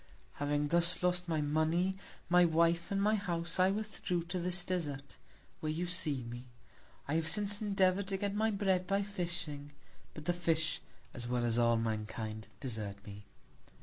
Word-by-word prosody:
Having 145 0 +1
thus 170 +2 +3
lost 180 0 +1
my 160 -2 0
Money, 160 +5 +1 0.3
my 180 0 +6
Wife, 170 0 +2
and 200 - 0
my 210 +2 +3
House, 175 -4 0
I 185 +1 +5
withdrew 200 -4 -2
to 180 +2 -3
this 180 +1 -2
Desart, 145 -6 -3 0.4
where 155 - -2
you 165 +3 -2
see 150 -7 0
me. 120 +1 -7 0.6
I 140 - -1
have 160 0 +1
since 205 +2 +4
endeavour'd 195 -2 +2
to 195 -1 -1
get 200 0 -2
my 220 +2 +2
Bread 190 -3 +1
by 200 +1 +1
Fishing; 170 -7 -4 0.4
but 155 - -8
the 175 - +2
Fish, 160 -3 0 0.3
as 120 -1 -4
well 120 0 0
as 120 0 +2
all 115 -1 +4
Mankind, 110 -1 -3
desert 110 -6 -2
me. 105 0 -10
170 Hz, 170 wpm, -33 LUFS, 145-185 Hz, 0.6 s, my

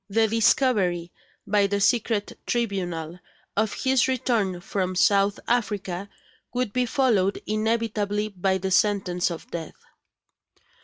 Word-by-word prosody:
The 220 +2 +3
discovery, 210 -6 +2 0.3
by 205 -1 +3
the 200 0 -1
secret 220 -1 +1
tribunal, 180 -8 -2 0.4
of 220 0 +1
his 265 -1 +2
return 225 -8 0
from 185 -1 -2
South 200 +2 +3
Africa 200 -5 -1 0.5
would 250 -5 -1
be 250 -1 +1
followed 225 -9 +2
inevitably 215 -1 -1
by 190 -1 0
the 190 +1 -3
sentence 185 -3 +2
of 170 -2 -8
death. 165 -2 -6
205 Hz, 115 wpm, -25 LUFS, 185-225 Hz, 0.5 s, The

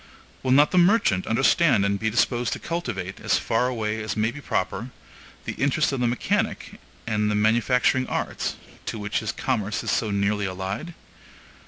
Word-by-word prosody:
Will 130 - -2
not 145 +3 +5
the 185 - +4
merchant 175 - +3
understand 135 - +3
and 100 0 0
be 110 - 0
disposed 120 +1 +1
to - - -5
cultivate, 120 - -4
as - - +1
far 125 +3 0
as 110 +1 -2
may 110 +2 +1
be 145 +4 -9
proper, 100 +1 -2 0.6
the - - -2
interests 140 +2 +1
of 135 - -2
the 120 - +2
mechanic 120 0 -1 0.3
and 105 -2 0
manufacturing 125 +4 +2
arts, - - -2 0.3
to - - -3
which 105 -1 -2
his 110 0 -3
commerce 110 -5 -2
is - - -1
so 110 - 0
nearly 100 0 0
allied? 95 - -5
115 Hz, 165 wpm, -24 LUFS, 105-130 Hz, 0.6 s, not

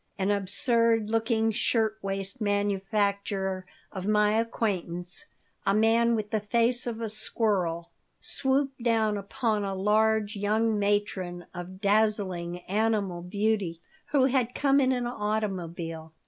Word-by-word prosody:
An 195 +1 +1
absurd 225 +2 +1
looking 225 0 +2
shirt 220 -1 +1
waist 195 +2 -4
manufacturer 200 -2 0 0.2
of 190 -1 -5
my 210 +1 +3
acquaintance, 180 -6 -1 0.4
a 195 - +2
man 230 +2 +4
with 210 -2 -3
the 220 - +1
face 235 +4 +1
of 230 -2 -3
a 225 - -1
squirrel, 200 -6 -1 0.3
swooped 270 -1 -1
down 225 -3 +2
upon 210 +1 -1
a 195 -1 -2
large 215 +2 +2
young 215 +2 +1
matron 200 -4 -1
of 180 +1 -8
dazzling 200 -4 +1
animal 200 -3 0
beauty 200 -2 -1 0.3
who 275 -3 +3
had 250 -2 +1
come 280 -1 +3
in 260 -1 +3
an 245 -1 0
automobile. 180 -8 -3
210 Hz, 125 wpm, -28 LUFS, 195-225 Hz, 0.4 s, man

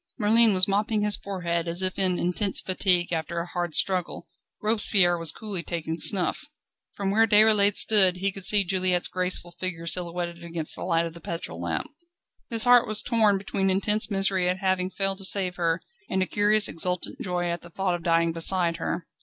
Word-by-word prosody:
Merlin 220 -1 +5
was 185 +2 +5
mopping 210 +2 0
his 210 0 +4
forehead 170 -4 -4
as 170 +3 -1
if 185 0 -1
in 185 -2 +2
intense 185 +3 0
fatigue 180 -2 0
after 165 +1 -4
a 170 - -4
hard 175 -3 -4
struggle; 185 -2 -1 0.3
Robespierre 205 -4 +1
was 165 -2 +1
coolly 205 -3 -5
taking 165 -1 -5
snuff. 190 - +1 0.5
From 195 -1 -2
where 225 +2 +3
Déroulède 210 -1 +4
stood, 190 -4 +4
he 195 +2 -1
could 195 0 -9
see 200 +2 +3
Juliette's 185 -1 0
graceful 180 -1 -3
figure 175 -1 -5
silhouetted 170 0 -3
against 165 -2 -2
the - - -7
light 170 -2 0
of 165 - -7
the 170 - -13
petrol 160 - -7
lamp. 85 -2 -3 0.6
His 230 -2 +2
heart 245 -1 +5
was 215 0 0
torn 220 -4 +2
between 195 0 -2
intense 210 +3 +1
misery 195 -2 +1
at 180 - -1
having 185 -1 -1
failed 195 0 -3
to - - -5
save 190 -2 -1
her 165 -1 0 0.3
and 190 - 0
a - - -2
curious, 210 +2 +2
exultant 180 +2 -4
joy 175 -1 -2
at 170 - -5
thought 180 +2 -3
of 175 - -4
dying 165 0 +1
beside 170 0 +2
her. 175 - -4
185 Hz, 190 wpm, -25 LUFS, 170-200 Hz, 0.6 s, Merlin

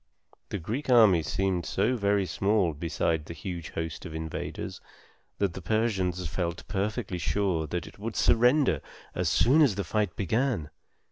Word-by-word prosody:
The - - -2
Greek 115 - -4
army 110 -9 +6
seemed 90 +3 -1
so 125 +4 +1
very 100 -3 +1
small 100 -3 +1
beside 80 0 -1
the 85 - -8
huge 85 +2 -6
host 80 -2 -4
of 80 -3 -7
invaders, 80 0 -5 0.6
that 100 -4 0
the 95 - -7
Persians 95 -3 0
felt 85 +1 -3
perfectly 100 -1 -2
sure 90 -3 0
that 85 +1 -3
it - - -13
would 110 +1 -4
surrender 125 +5 +4 0.3
as - - 0
soon 140 +7 +4
as 135 -10 +4
the 100 - -2
fight 105 0 -1
began. 105 - 0
95 Hz, 155 wpm, -28 LUFS, 85-110 Hz, 0.6 s, army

